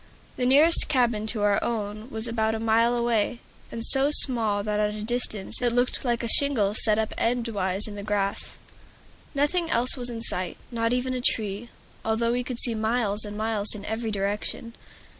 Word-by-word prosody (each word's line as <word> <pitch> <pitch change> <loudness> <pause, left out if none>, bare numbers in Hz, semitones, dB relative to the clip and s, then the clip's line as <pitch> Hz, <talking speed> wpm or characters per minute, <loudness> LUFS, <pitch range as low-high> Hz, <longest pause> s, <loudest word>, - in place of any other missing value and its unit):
The 250 - -1
nearest 300 +6 +4
cabin 240 -6 0
to 215 -2 -2
our 205 -1 +2
own 215 0 -4
was 220 -2 -5
about 220 -1 -1
a - - -4
mile 230 +2 +2
away, 235 -1 0 0.3
and 230 0 -5
so 270 +1 +4
small 225 -8 +4
that 210 0 -2
at 210 0 0
that 215 0 -6
distance 225 -4 +1
it 240 -1 +1
looked 245 +1 0
like 240 -2 -1
a - - -2
shingle 225 -5 +3
set 215 0 0
up 220 -1 -2
endwise 215 -5 -1
in 210 - -8
the 205 - -7
grass. 200 -1 -3 0.8
Nothing 325 +4 0
else 245 -2 0
was 250 -2 -5
in 230 -1 -7
sight, 185 -5 -3
not 230 -1 -1
even 250 +1 -1
a 250 - -3
tree, 215 0 -1 0.3
although 225 +1 0
we 245 +1 -1
could 250 -1 -6
see 235 - +4
miles 220 -1 +1
and 210 0 -7
miles 215 -1 +4
in 205 -1 -9
every 220 +1 -4
direction. 205 +3 -3
225 Hz, 190 wpm, -25 LUFS, 210-245 Hz, 0.8 s, nearest